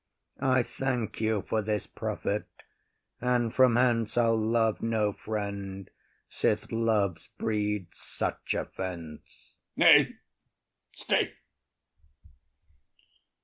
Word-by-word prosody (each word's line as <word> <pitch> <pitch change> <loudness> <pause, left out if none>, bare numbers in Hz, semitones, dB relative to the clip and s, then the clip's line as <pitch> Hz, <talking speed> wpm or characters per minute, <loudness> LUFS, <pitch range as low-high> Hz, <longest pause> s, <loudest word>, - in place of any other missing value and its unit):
I 130 -2 +3
thank 125 -4 -3
you 110 -2 +1
for 110 - +1
this 105 -1 -2
profit, - - -3 0.8
and 120 -2 +1
from 130 -3 +5
hence 120 -3 +2
I’ll 115 -1 +4
love 110 0 +1
no 110 -2 +1
friend, 100 -3 -5 0.4
sith 105 0 -1
love 110 -5 0
breeds 105 -3 -2
such - - -3
offence. 85 -5 -7 0.2
OTHELLO. - - +7
Nay, - - -11 0.8
stay. - - 0
110 Hz, 95 wpm, -29 LUFS, 105-115 Hz, 0.8 s, OTHELLO